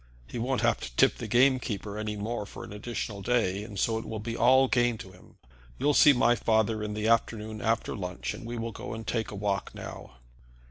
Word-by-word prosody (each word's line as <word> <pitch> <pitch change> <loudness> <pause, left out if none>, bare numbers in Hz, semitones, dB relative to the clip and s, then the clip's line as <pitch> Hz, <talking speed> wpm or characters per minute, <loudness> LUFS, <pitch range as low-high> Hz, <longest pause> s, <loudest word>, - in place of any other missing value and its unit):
He 115 - -6
won't 125 +2 0
have - - +2
to - - -8
tip - - +4
the - - -5
game 130 +2 +4
keeper 105 -4 -5
any 105 0 -3
more 105 0 -3
for - - -9
an - - -9
additional 105 -1 -5
day, 105 -4 +1
and 105 -2 -9
so 110 +3 +1
it - - -7
will 110 - -5
be 115 +2 -4
all 130 +3 +5
gain 120 -2 +2
to 95 - -10
him. 90 - -18 0.4
You'll 145 - +2
see 145 - +8
my 120 -3 +4
father 110 -2 +1
in 105 0 -3
the 105 +1 -1
afternoon 110 -1 0
after 115 0 0
lunch, 90 -3 -4
and - - -9
we 120 +1 -5
will 115 0 -3
go 110 - -6
and 110 0 -7
take 110 0 -1
a - - -7
walk 100 -1 -2
now." - - -8
110 Hz, 230 wpm, -28 LUFS, 105-120 Hz, 0.4 s, see